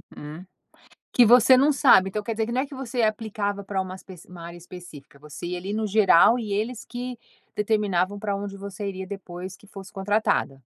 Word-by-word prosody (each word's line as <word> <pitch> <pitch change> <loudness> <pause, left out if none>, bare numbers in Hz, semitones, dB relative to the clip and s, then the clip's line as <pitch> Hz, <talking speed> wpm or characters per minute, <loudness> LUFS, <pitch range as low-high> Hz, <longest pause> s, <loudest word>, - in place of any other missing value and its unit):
Hum, 150 +4 -9 0.7
que 245 - +6
você 250 +3 +7
não 285 +3 +4
sabe 195 -7 +5
então 210 +2 -4
quer 230 - -3
dizer 220 0 -1
que 235 - -5
não 255 +2 +1
é - - -2
que 280 - -13
você 255 -2 -3
aplicava 210 -2 -1
pra 195 -1 -2
uma 185 0 -6
especi 185 -2 -13
uma 175 -2 -10
área 170 0 -9
específica 165 -6 -13
você 150 +2 -8
ia 180 0 -3
ali 195 +3 -5
no 220 0 -1
geral 215 +2 +5
e 210 -3 -4
eles 225 +3 -3
que 245 0 -6 0.4
determinavam 205 -3 0
pra 200 -1 -2
onde 200 0 -6
você 200 +1 -6
iria 190 -1 -5
depois 185 -1 -8
que 205 - -20
fosse 195 -1 -11
contratada. 195 -8 0
200 Hz, 210 wpm, -25 LUFS, 185-220 Hz, 0.7 s, você